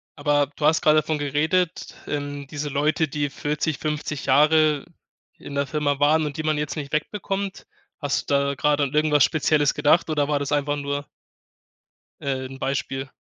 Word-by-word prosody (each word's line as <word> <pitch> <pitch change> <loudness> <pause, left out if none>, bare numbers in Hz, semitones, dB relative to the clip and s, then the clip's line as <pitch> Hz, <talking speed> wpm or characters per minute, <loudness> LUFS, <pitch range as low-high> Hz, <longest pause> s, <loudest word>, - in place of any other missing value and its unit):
aber 145 -1 +2
du 150 - -2
hast 155 +1 +4
gerade 155 0 +5
davon 155 0 -2
geredet, 160 +5 0
ähm, 145 -1 -4
diese 145 +1 -4
Leute, 150 +3 +1
die 145 +1 -1
40, 150 +1 -2
50 150 -1 -3
Jahre 150 +1 +4 0.5
in 140 - -8
der 140 0 0
Firma 145 -1 -1
waren 155 +2 +3
und 145 -2 -5
die 155 - -3
man 155 -1 +1
jetzt 150 -1 -3
nicht 145 -1 -6
wegbekommt. 195 +4 -3 0.3
Hast 145 -2 -2
du - - +4
da 140 0 +1
gerade 145 +2 +2
an 140 - -2
irgendwas 150 -2 +4
Spezielles 150 -1 +2
gedacht 150 +3 +3
oder 145 -2 0
war 145 -1 +1
das 140 +1 -2
einfach 145 0 0
nur 145 0 -3 1.2
äh, 130 -1 -2
'n 135 +1 -10
Beispiel? 135 0 -3
145 Hz, 175 wpm, -23 LUFS, 140-155 Hz, 1.2 s, gerade